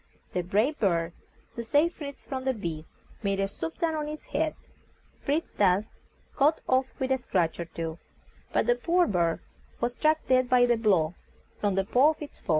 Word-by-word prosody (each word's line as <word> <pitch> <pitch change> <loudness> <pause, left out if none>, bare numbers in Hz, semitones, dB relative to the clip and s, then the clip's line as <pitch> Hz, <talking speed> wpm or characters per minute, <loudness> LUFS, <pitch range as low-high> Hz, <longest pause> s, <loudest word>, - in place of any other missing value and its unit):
The 180 - +1
brave 215 - +1
bird, 170 -4 +1 0.4
to 235 - -4
save 295 +8 +3
Fritz 280 -2 -8
from 260 -1 -4
the 260 -1 0
beast, 165 -6 -5 0.3
made 195 -2 0
a 195 - +1
swoop 160 -4 -6
down 330 -1 0
on 305 -1 -2
its 305 0 -7
head. 310 +2 +1 0.7
Fritz 300 +3 0
thus 195 +1 +3 0.5
got 295 +3 +3
off 260 0 +3
with 265 -1 -1
a 265 - +3
scratch 175 -9 0
or 170 - -2
two, 165 0 -5 0.5
but - - +2
the 240 - +5
poor 345 +9 +2
bird 170 -4 +1 0.4
was 240 +1 0
struck 310 +4 +2
dead 255 -1 +3
by 250 -1 +5
a 240 -1 +5
blow 190 -8 +2 0.5
from 205 -2 +1
the 195 - +2
paw 255 +8 +5
of - - -26
its 290 - -11
foe. - - -22
240 Hz, 195 wpm, -28 LUFS, 185-285 Hz, 0.7 s, the